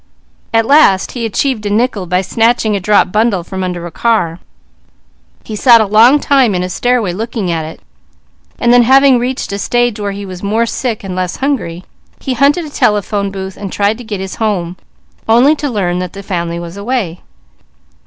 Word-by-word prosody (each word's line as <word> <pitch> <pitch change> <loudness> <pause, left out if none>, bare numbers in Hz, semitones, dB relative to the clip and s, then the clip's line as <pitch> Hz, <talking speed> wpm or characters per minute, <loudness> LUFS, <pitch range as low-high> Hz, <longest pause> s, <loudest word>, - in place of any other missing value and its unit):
At 225 0 +2
last 275 -9 +4
he 235 -2 -3
achieved 235 +1 -1
a 205 - -2
nickel 210 -3 0
by 180 +2 +1
snatching 225 +2 +1
a - - -1
dropped 200 0 +2
bundle 210 -4 +1
from 190 +1 -5
under 180 -2 -4
a 175 - -7
car. 175 -6 0 1.0
He 215 - -7
sat 235 +2 +6
a 220 - +2
long 225 +8 +5
time 265 -8 +2
in 180 - -1
a 180 - -4
stairway 240 -4 0
looking 215 -2 -3
at 160 -2 -2
it, 160 - -10 0.8
and 240 0 +2
then 245 - +6
having 265 +1 +5
reached 250 -1 -3
a 200 - -4
stage 240 +1 0
where 205 -1 -2
he 200 +1 -7
was 185 -2 -9
more 220 +3 0
sick, 230 -2 -3
and 190 -2 -5
less 185 -1 -2
hungry, 225 -11 -3 0.4
he 265 - -3
hunted 285 +7 +2
a 300 - -9
telephone 205 -4 0
booth 190 -1 -7
and 200 -2 -7
tried 205 +3 0
to - - -8
get 215 -4 -5
his 190 0 -6
home, 185 -6 -2 0.5
only 250 +7 +5
to 290 -1 -3
learn 180 -6 -1
that 180 -1 -5
the 200 0 -9
family 170 -3 -3
was 170 +2 -8
away. 200 -5 -3
210 Hz, 195 wpm, -14 LUFS, 185-240 Hz, 1.0 s, sat